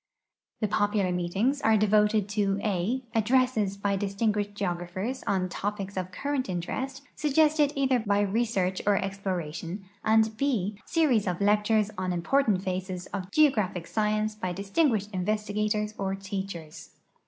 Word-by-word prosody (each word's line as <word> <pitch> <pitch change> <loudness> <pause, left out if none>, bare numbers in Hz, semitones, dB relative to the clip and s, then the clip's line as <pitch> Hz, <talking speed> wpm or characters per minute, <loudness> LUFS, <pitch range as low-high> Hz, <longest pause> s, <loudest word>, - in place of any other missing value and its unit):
The 215 - +2
popular 205 -2 +1
meetings 195 +11 0
are 220 0 +4
devoted 210 0 +3
to 200 -1 0
(a) 215 +6 0
addresses 225 -3 +2
by 200 0 0
distin 200 +2 0
guished 205 -1 -3
geograpliers 185 +5 -3
on 185 -2 +1
topics 200 +1 -4
of 185 -1 -3
current 275 +2 -2
interest 265 +10 -4
suggested 300 0 +3
either 265 -2 +2
by 205 -2 +1
research 200 -3 0
or 205 -1 +4
exploration, 190 -2 -4 0.2
and 220 0 +5 0.2
(//) 210 -7 -1
series 270 - +2
of 180 -1 -1
lectures 210 +1 +2
on 180 -2 -1
impor 275 +11 +2
tant 190 -3 +2
phases 185 -1 -3
of 190 -2 -4
geograi)hic 210 - +2
science 215 0 0
by 185 -4 -4
distinguished 205 - 0
investigators 210 +2 -1
or 195 -1 -1
teachers. 195 -5 -7
205 Hz, 140 wpm, -28 LUFS, 190-220 Hz, 0.2 s, and